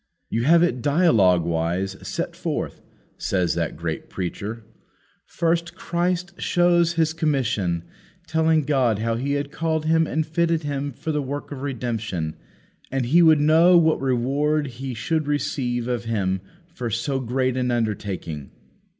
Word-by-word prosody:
"You 115 Hz, +2 st, 0 dB
have 170 Hz, +3 st, +6 dB
it 150 Hz, -8 st, 0 dB
dialoguewise 95 Hz, -, +2 dB
set -, -, -4 dB
forth," -, -, -3 dB, 0.4 s
says 90 Hz, -3 st, 0 dB
that -, -, -2 dB
great -, -, -4 dB
preacher. 105 Hz, +5 st, -5 dB, 0.6 s
"First 170 Hz, 0 st, -1 dB
Christ 180 Hz, +1 st, -2 dB
shows 175 Hz, -1 st, +3 dB
His 160 Hz, -2 st, +1 dB
commission, 120 Hz, -, 0 dB, 0.4 s
telling 160 Hz, -1 st, +2 dB
God 130 Hz, -6 st, +2 dB
how 115 Hz, +2 st, -1 dB
He 135 Hz, +5 st, -1 dB
had 145 Hz, 0 st, -2 dB
called 160 Hz, -1 st, -1 dB
Him 160 Hz, 0 st, +3 dB
and 155 Hz, 0 st, -1 dB
fitted 165 Hz, 0 st, 0 dB
Him 145 Hz, -1 st, -2 dB
for 155 Hz, +5 st, -4 dB
the 150 Hz, -1 st, 0 dB
work 145 Hz, +2 st, -5 dB
of 135 Hz, -2 st, -6 dB
redemption, 110 Hz, -, -3 dB, 0.6 s
and 135 Hz, -2 st, 0 dB
He 160 Hz, +8 st, +5 dB
would 160 Hz, -2 st, +6 dB
know 165 Hz, +4 st, +6 dB
what 160 Hz, -4 st, +3 dB
reward 140 Hz, +4 st, +1 dB, 0.2 s
He 130 Hz, -2 st, -4 dB
should 155 Hz, +6 st, -1 dB
receive 125 Hz, -4 st, -1 dB
of 120 Hz, -2 st, -2 dB
Him 95 Hz, -5 st, -1 dB, 0.3 s
for 125 Hz, -8 st, -4 dB
so 130 Hz, +5 st, -1 dB
great 130 Hz, +1 st, 0 dB
an 125 Hz, -1 st, 0 dB
undertaking. 100 Hz, -, -3 dB
135 Hz, 145 wpm, -23 LUFS, 115-160 Hz, 0.6 s, have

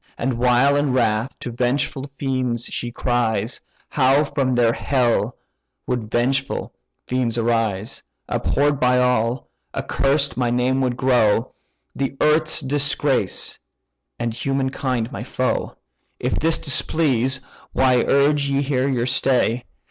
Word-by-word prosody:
And 120 Hz, -1 st, -2 dB
while 125 Hz, +3 st, +4 dB
in 145 Hz, -2 st, +1 dB
wrath 115 Hz, 0 st, 0 dB
to 120 Hz, -, -5 dB
vengeful 130 Hz, +3 st, -1 dB
fiends 130 Hz, -4 st, -1 dB
she 120 Hz, -, -4 dB
cries, 115 Hz, -2 st, -1 dB, 0.3 s
How 135 Hz, +1 st, +3 dB
from 140 Hz, -3 st, -1 dB
their 120 Hz, -1 st, +3 dB
hell 125 Hz, -3 st, 0 dB, 0.5 s
would 120 Hz, -4 st, -3 dB
vengeful 135 Hz, +4 st, -1 dB, 0.3 s
fiends 125 Hz, -2 st, -1 dB
arise! 115 Hz, -3 st, 0 dB, 0.3 s
Abhorr'd 145 Hz, 0 st, +1 dB
by 125 Hz, 0 st, +3 dB
all, 125 Hz, 0 st, +1 dB, 0.3 s
accursed 140 Hz, +1 st, 0 dB
my 125 Hz, -2 st, +1 dB
name 125 Hz, +2 st, +1 dB
would 125 Hz, -2 st, 0 dB
grow, 120 Hz, -4 st, +2 dB, 0.4 s
The 135 Hz, 0 st, -3 dB
earth's 155 Hz, +1 st, +2 dB
disgrace, 140 Hz, -5 st, 0 dB, 0.6 s
and 120 Hz, -1 st, -2 dB
human 135 Hz, +2 st, -1 dB
kind 125 Hz, -3 st, -2 dB
my -, -, -6 dB
foe. 130 Hz, 0 st, -2 dB, 0.4 s
If -, -, -1 dB
this 165 Hz, +1 st, +2 dB
displease, 135 Hz, -3 st, 0 dB, 0.3 s
why 130 Hz, -1 st, +3 dB
urge 140 Hz, +1 st, +2 dB
ye 140 Hz, 0 st, +1 dB
here 135 Hz, -1 st, 0 dB
your 125 Hz, -3 st, 0 dB
stay? 125 Hz, -2 st, +1 dB
130 Hz, 125 wpm, -21 LUFS, 120-140 Hz, 0.6 s, while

